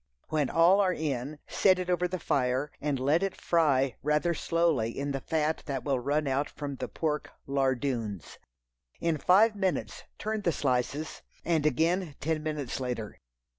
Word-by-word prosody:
When 150 Hz, -4 st, +1 dB
all 170 Hz, +4 st, +5 dB
are 185 Hz, -2 st, +2 dB
in, 145 Hz, -1 st, -3 dB
set 190 Hz, -2 st, +4 dB
it 185 Hz, -1 st, -3 dB
over 180 Hz, 0 st, +1 dB
the 185 Hz, +1 st, -3 dB
fire, 135 Hz, -2 st, 0 dB
and 145 Hz, -2 st, -1 dB
let 145 Hz, +6 st, +2 dB
it 195 Hz, -1 st, -2 dB
fry 140 Hz, -7 st, +2 dB
rather 150 Hz, +4 st, +1 dB
slowly 160 Hz, -9 st, 0 dB
in 140 Hz, +1 st, -2 dB
the 135 Hz, -, -2 dB
fat 155 Hz, +1 st, 0 dB
that 135 Hz, -3 st, -3 dB
will 135 Hz, -3 st, 0 dB
run 145 Hz, +4 st, 0 dB
out 140 Hz, +2 st, 0 dB
from 140 Hz, -2 st, -6 dB
the -, -, -4 dB
pork 150 Hz, -2 st, -2 dB, 0.2 s
"lardoons." 130 Hz, -, -1 dB, 0.6 s
In 165 Hz, -3 st, 0 dB
five 210 Hz, +7 st, +5 dB
minutes 180 Hz, -, -2 dB
turn 215 Hz, 0 st, -2 dB
the 175 Hz, -, +1 dB
slices, 140 Hz, +2 st, -1 dB, 0.2 s
and 160 Hz, -3 st, +2 dB
again 165 Hz, +3 st, +1 dB
ten 160 Hz, +1 st, -1 dB
minutes 150 Hz, -5 st, -3 dB
later. 125 Hz, -5 st, -4 dB
150 Hz, 165 wpm, -29 LUFS, 135-170 Hz, 0.6 s, all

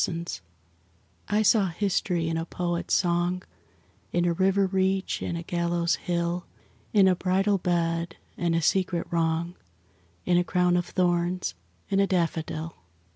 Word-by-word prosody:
SYMBOLS 170 Hz, -, -3 dB, 0.9 s
I 210 Hz, +1 st, +2 dB
saw 205 Hz, -2 st, +4 dB
history 180 Hz, -2 st, 0 dB
in 165 Hz, -, -1 dB
a 165 Hz, -, -1 dB
poet's 175 Hz, 0 st, -1 dB
song, 175 Hz, 0 st, +1 dB, 0.7 s
In 175 Hz, 0 st, +1 dB
a 170 Hz, -, +2 dB
river 195 Hz, +2 st, +2 dB
reach 190 Hz, 0 st, 0 dB
and 170 Hz, -, -2 dB
a 170 Hz, -, -5 dB
gallows 170 Hz, 0 st, 0 dB
hill, 175 Hz, 0 st, -2 dB, 0.4 s
In 200 Hz, -3 st, +5 dB
a 185 Hz, -, +4 dB
bridal 195 Hz, +2 st, +1 dB
bed, 170 Hz, -1 st, -1 dB, 0.2 s
and 170 Hz, -1 st, 0 dB
a 165 Hz, -, +1 dB
secret 180 Hz, 0 st, +1 dB
wrong, 165 Hz, 0 st, 0 dB, 0.7 s
In 175 Hz, 0 st, +4 dB
a -, -, +2 dB
crown 180 Hz, 0 st, +2 dB
of 175 Hz, -1 st, 0 dB
thorns: 175 Hz, -, 0 dB, 0.3 s
in 195 Hz, -, +1 dB
a 195 Hz, -, +4 dB
daffodil. 165 Hz, -2 st, -1 dB
175 Hz, 145 wpm, -26 LUFS, 170-185 Hz, 0.9 s, In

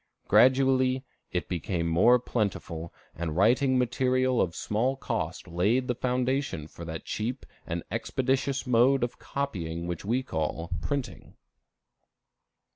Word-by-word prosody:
Gradually, 130 Hz, 0 st, +4 dB, 0.3 s
it 90 Hz, -3 st, -2 dB
became 85 Hz, -1 st, -2 dB
more 95 Hz, +10 st, +5 dB
plentiful, 95 Hz, -8 st, -3 dB, 0.2 s
and 80 Hz, -2 st, -4 dB
writing 130 Hz, +6 st, +4 dB
material 130 Hz, 0 st, +2 dB
of 85 Hz, -2 st, -1 dB
small 120 Hz, +6 st, 0 dB
cost 105 Hz, -11 st, -3 dB
laid 105 Hz, +9 st, +1 dB
the 125 Hz, -, +1 dB
foundation 125 Hz, -, -1 dB
for 85 Hz, -, -10 dB
that 80 Hz, -1 st, -6 dB
cheap 120 Hz, +5 st, -3 dB, 0.2 s
and 85 Hz, -1 st, -3 dB
expeditious 130 Hz, +4 st, 0 dB
mode 125 Hz, +2 st, +4 dB
of 120 Hz, -, -3 dB
copying 85 Hz, -12 st, -3 dB
which 85 Hz, -2 st, -4 dB
we 120 Hz, +6 st, 0 dB
call 80 Hz, -4 st, -3 dB
printing. 140 Hz, +3 st, -4 dB
120 Hz, 120 wpm, -28 LUFS, 85-130 Hz, 0.3 s, more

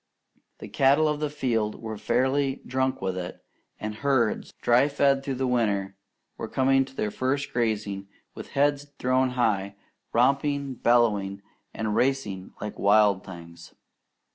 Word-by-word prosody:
The -, -, -9 dB
cattle 140 Hz, +3 st, +3 dB
of 150 Hz, -1 st, -1 dB
the 150 Hz, -1 st, -1 dB
field 115 Hz, -7 st, -1 dB
were 110 Hz, -1 st, -5 dB
fairly 130 Hz, +5 st, 0 dB
drunk 130 Hz, -3 st, -1 dB
with 95 Hz, -1 st, -1 dB
it, 90 Hz, -1 st, -6 dB, 0.4 s
and 105 Hz, 0 st, -4 dB
herds, 120 Hz, -1 st, 0 dB
dry 120 Hz, +4 st, +4 dB
fed 140 Hz, -1 st, +2 dB
during 135 Hz, -1 st, -4 dB
the 130 Hz, -, 0 dB
winter, 105 Hz, -6 st, 0 dB, 0.4 s
were -, -, -4 dB
coming 135 Hz, 0 st, +2 dB
to 135 Hz, 0 st, -16 dB
their 105 Hz, -4 st, -2 dB
first 140 Hz, +4 st, -2 dB
grazing 105 Hz, -4 st, -1 dB, 0.3 s
with -, -, -9 dB
heads 145 Hz, 0 st, +2 dB
thrown 130 Hz, +1 st, +2 dB
high, 100 Hz, -4 st, +1 dB, 0.4 s
romping, 140 Hz, +3 st, +1 dB
bellowing, 105 Hz, -5 st, +1 dB, 0.3 s
and 110 Hz, -1 st, -2 dB
racing 110 Hz, -9 st, -1 dB
like 105 Hz, 0 st, -6 dB
wild 100 Hz, -1 st, +4 dB
things. 85 Hz, -2 st, -12 dB
120 Hz, 140 wpm, -26 LUFS, 105-135 Hz, 0.4 s, dry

